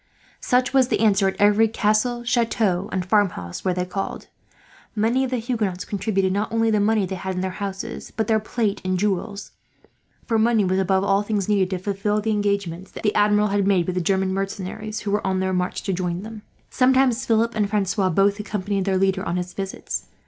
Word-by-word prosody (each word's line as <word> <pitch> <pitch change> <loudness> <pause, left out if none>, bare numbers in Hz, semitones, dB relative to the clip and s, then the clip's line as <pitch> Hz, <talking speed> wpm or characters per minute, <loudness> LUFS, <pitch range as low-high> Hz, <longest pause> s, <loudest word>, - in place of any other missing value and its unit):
Such 250 +1 +1
was 265 -2 +4
the - - 0
answer 200 -3 +4
at 190 - -1
every 210 +2 +4
castle, 225 +2 0
chateau, 225 -6 0
and 185 -2 -2
farmhouse 180 - 0
where 185 -2 0
they 180 0 -1
called. 195 +2 -5 0.7
Many 230 +5 +2
of 260 - -1
the 255 - -1
Huguenots 220 -6 -2
contributed 195 -2 0
not 205 +2 -1
only 225 0 +2
the 210 - +2
money 210 0 +2
they 190 - -5
had 190 0 -4
in 180 - -2
their 190 0 -2
houses, 200 +3 -5
but 220 - -2
their 220 +1 +2
plate 215 -1 -2
and 185 0 0
jewels; 200 +1 -2 0.7
for 225 -2 +1
money 220 -2 +3
was, 185 +1 +1
above 190 0 +2
all 195 0 +2
things, 205 -2 -2
needed 200 -3 +2
to 190 - -2
fulfil 200 +2 -1
the 220 +1 -1
engagements 200 -4 -1
the 210 - -2
Admiral 210 0 +3
had 200 -1 +1
made 185 -4 +3
with 185 - -2
the 180 - -1
German 190 +1 +1
mercenaries 195 +3 -4
who 205 - -3
were 205 0 0
on 190 -1 0
their 190 0 0
march 180 0 -2
to 195 - -1
join 180 0 -2
him. 220 -1 -9 0.3
Sometimes 255 -1 +3
Philip 230 +1 +2
and 210 -2 0
Francois 200 -2 +1
both 200 +4 +2
accompanied 200 -2 -2
their 190 -1 +1
leader 190 0 +1
on 175 -1 -2
his 180 0 -4
visits. 195 -1 -5
200 Hz, 205 wpm, -23 LUFS, 190-220 Hz, 0.7 s, was